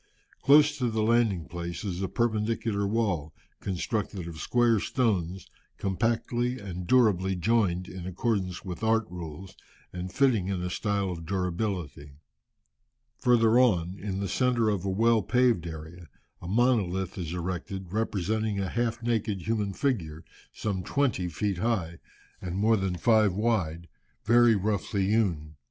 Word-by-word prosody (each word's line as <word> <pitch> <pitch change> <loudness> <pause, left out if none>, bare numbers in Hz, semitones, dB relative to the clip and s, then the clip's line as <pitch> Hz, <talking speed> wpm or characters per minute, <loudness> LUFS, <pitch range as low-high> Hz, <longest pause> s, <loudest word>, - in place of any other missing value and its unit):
Close 145 +1 +6
to 125 -2 +1
the 110 -1 0
landing 110 -7 +2
place 85 +3 -5
is 90 -2 -3
a 95 - 0
perpendicular 110 -2 0
wall, 100 -9 -1 0.2
constructed 100 -1 -3
of 85 -2 -8
square 120 -3 +2
stones, 95 -7 -1 0.3
compactly 120 +5 -1
and 90 -4 -6
durably 100 -7 +3
joined 90 -2 +1
in 90 -1 -7
accordance 95 -1 -2
with 90 +3 -6
art 110 0 +2
rules, 90 +2 -8 0.4
and 90 +1 -5
fitting 120 -8 +2
in 95 -2 -1
a 90 - -3
style 100 -2 -1
of 85 -2 -6
durability. 90 -6 -3 1.1
Further 120 -1 +4
on, 90 -8 +2
in 95 -1 -3
the 100 - -2
centre 120 -1 +1
of 100 -3 -1
a - - 0
well 115 +3 +3
paved 115 -4 +2
area, 80 +2 -9 0.3
a 85 - -8
monolith 95 -4 +1
is 85 -3 -4
erected, 90 +1 -5
representing 110 0 -1
a 95 -2 -1
half 120 0 -1
naked 110 -5 -1
human 105 -3 -1
figure, 90 - -2 0.3
some 100 -4 -3
twenty 110 -4 0
feet 95 +2 -2
high, 90 -7 -1 0.4
and 90 -1 -4
more 110 +3 +4
than 95 -3 -1
five 110 +1 +3
wide, 95 -7 0 0.4
very 120 0 +5
roughly 100 -1 -1
hewn. 85 -9 0
100 Hz, 140 wpm, -28 LUFS, 90-115 Hz, 1.1 s, Close